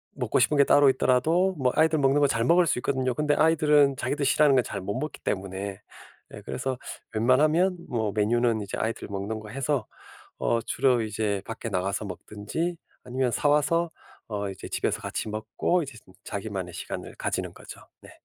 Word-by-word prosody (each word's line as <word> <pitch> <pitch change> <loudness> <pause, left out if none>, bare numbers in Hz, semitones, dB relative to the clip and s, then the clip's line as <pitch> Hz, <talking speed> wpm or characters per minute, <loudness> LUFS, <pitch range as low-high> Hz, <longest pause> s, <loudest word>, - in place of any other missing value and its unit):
먹고 - - 0
싶은 150 - +3
게 140 - +7
따로 145 0 +5
있더라도 160 +9 +2
뭐 130 -3 +2
아이들 160 -1 +3
먹는 140 +1 +3
거 145 - +5
잘 115 -3 0
먹을 175 +6 +5
수 130 - +1
있거든요. 130 0 0
그런데 150 +3 +1
아이들은 150 -3 +4
자기들 140 +4 -2
싫어하는 140 +1 +4
걸 125 - +4
잘 100 - -5
못 100 +5 -3
먹기 150 +2 -5
때문에. 95 +1 -3 0.5
네. - - -10
그래서 130 -1 -3 0.4
웬만하면 155 - +3
뭐 110 -3 -1
메뉴는 115 +1 +2
이제 100 - -5
아이들 115 +1 -3
먹는 100 +3 -3
거 105 - -10
해서 135 0 -1 0.5
어 115 - +1
주로 125 -1 +2
이제 105 -2 -1
밖에 115 +1 -6
나가서 100 +1 -1
먹든지, 105 - -4 0.3
아니면 125 0 0
사 145 - +1
와서 165 +4 +2 0.4
어 105 -2 -3
이제 95 - -9
집에서 - - -1
같이 - - -4
먹고 110 +11 -1
이제 135 -4 -10
음 - - -16
자기만의 100 -3 -5
시간을 - - -6
가지는 - - -3
거죠. - - -11 0.2
네. - - -13
125 Hz, 380 characters per minute, -26 LUFS, 105-145 Hz, 0.5 s, 게